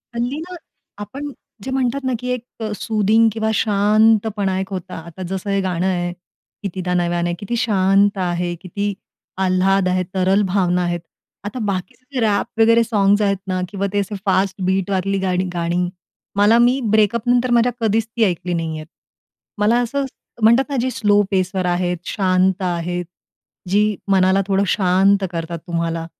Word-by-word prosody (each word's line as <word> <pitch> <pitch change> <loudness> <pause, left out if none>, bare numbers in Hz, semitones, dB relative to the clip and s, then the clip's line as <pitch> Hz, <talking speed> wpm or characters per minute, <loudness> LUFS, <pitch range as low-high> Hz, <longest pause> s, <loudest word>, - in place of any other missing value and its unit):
हल्ली 245 +5 -2
ना, 265 - -5
की 250 +2 -5
एक 245 -1 -3 0.2
अ, 215 -1 -3
सूदिंग 220 +1 +3
किंवा 220 0 -1
शांतपणा 210 -1 +2
एक 190 - -4
होता. 185 -1 -6
आता 175 +3 -8
जसं 190 +1 -3
हे 195 0 +1
गाणं 180 -1 -1
आहे, 175 -1 -1 0.5
कितीदा 185 -2 -3
नव्यानं 175 0 0
किती 220 +4 -3
शांत 200 -1 +3
आहे, 175 -1 -1
किती 200 +2 -3 0.5
आल्हाद 185 +1 +2
आहे, 185 0 +1
तरल 190 +2 +2
भावना 180 -2 +2
आहेत. 175 0 -1 0.5
आता 230 +5 -4
बाकीचे 190 +4 -4
जे 250 - +1
रॅप 215 +1 0
वगैरे 230 +1 +5
सॉंग्स 205 -2 +2
आहेत 200 -1 +2
ना 185 -1 -1
किंवा 200 -1 -2
ते 205 - +2
असे 200 +1 -3
फास्ट 190 0 +1
बीट 190 0 0
वरली 195 +1 0
गाणी 185 -1 0
गाणी. 175 +1 -1 0.5
मला 205 +3 +5
मी 245 +3 +4
ब्रेकअप 220 +2 +2
नंतर 245 0 +2
माझ्या 240 +1 +4
कधीच 225 0 +1
ती 225 0 -1
ऐकली 180 -2 0
नाहीयेत. 160 -2 -3 0.7
मला 225 +4 +3
असं 275 +3 -1 0.4
म्हणतात 235 +5 +5
ना 280 - -2
जी 260 - 0
स्लो 205 -3 +3
पेसवर 185 0 0
आहेत, 180 0 0
शांत 185 -1 +1
आहेत, 175 0 -2 0.6
जी 210 +1 +2 0.2
मनाला 190 0 +4
थोडं 195 0 +2
शांत 195 +1 +3
करतात 165 0 -4
तुम्हाला. 165 -1 -2
195 Hz, 155 wpm, -20 LUFS, 180-220 Hz, 0.7 s, वगैरे